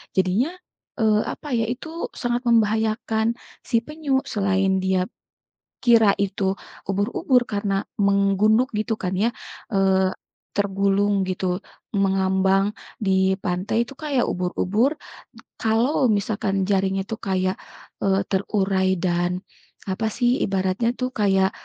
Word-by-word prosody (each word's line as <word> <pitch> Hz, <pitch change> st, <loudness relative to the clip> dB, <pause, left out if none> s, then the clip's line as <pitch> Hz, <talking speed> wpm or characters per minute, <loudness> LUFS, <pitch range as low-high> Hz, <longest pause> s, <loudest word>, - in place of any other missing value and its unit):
Jadinya, 190 Hz, -, +2 dB, 0.5 s
eee, 215 Hz, -1 st, +3 dB
apa 285 Hz, -5 st, -4 dB
ya, 225 Hz, -, +1 dB
itu 320 Hz, +7 st, -5 dB
sangat 240 Hz, -1 st, -2 dB
membahayakan 220 Hz, -1 st, +2 dB, 0.4 s
si 230 Hz, -, +2 dB
penyu, 285 Hz, +2 st, -1 dB
selain 190 Hz, -2 st, +1 dB
dia 190 Hz, -1 st, +1 dB, 0.7 s
kira 225 Hz, -4 st, +5 dB
itu 195 Hz, -1 st, 0 dB, 0.4 s
ubur-ubur 220 Hz, +6 st, +2 dB
karena 200 Hz, -2 st, 0 dB, 0.2 s
menggunduk 200 Hz, +4 st, +3 dB
gitu 220 Hz, +2 st, 0 dB
kan 180 Hz, 0 st, -2 dB
ya, 220 Hz, +5 st, +2 dB, 0.4 s
eee, 190 Hz, -1 st, +3 dB, 0.4 s
tergulung 200 Hz, 0 st, +1 dB
gitu, 185 Hz, -1 st, -1 dB, 0.4 s
mengambang 190 Hz, 0 st, +2 dB, 0.4 s
di 190 Hz, -1 st, +3 dB
pantai 185 Hz, +6 st, 0 dB
itu 275 Hz, -, -9 dB
kayak 290 Hz, -5 st, 0 dB
ubur-ubur, 200 Hz, -, +1 dB, 0.7 s
kalau 235 Hz, +5 st, +2 dB
misalkan 200 Hz, -2 st, 0 dB
jaringnya 195 Hz, -1 st, +1 dB
itu 225 Hz, -, -4 dB
kayak, 185 Hz, -1 st, 0 dB, 0.5 s
eee, 195 Hz, 0 st, +2 dB
terurai 190 Hz, -1 st, +1 dB
dan, 175 Hz, +1 st, -1 dB, 0.4 s
apa 195 Hz, +4 st, -1 dB
sih, 245 Hz, +1 st, +2 dB
ibaratnya 190 Hz, +4 st, 0 dB
tuh 255 Hz, 0 st, -1 dB
kayak, 195 Hz, -2 st, +3 dB
200 Hz, 115 wpm, -23 LUFS, 190-225 Hz, 0.7 s, kira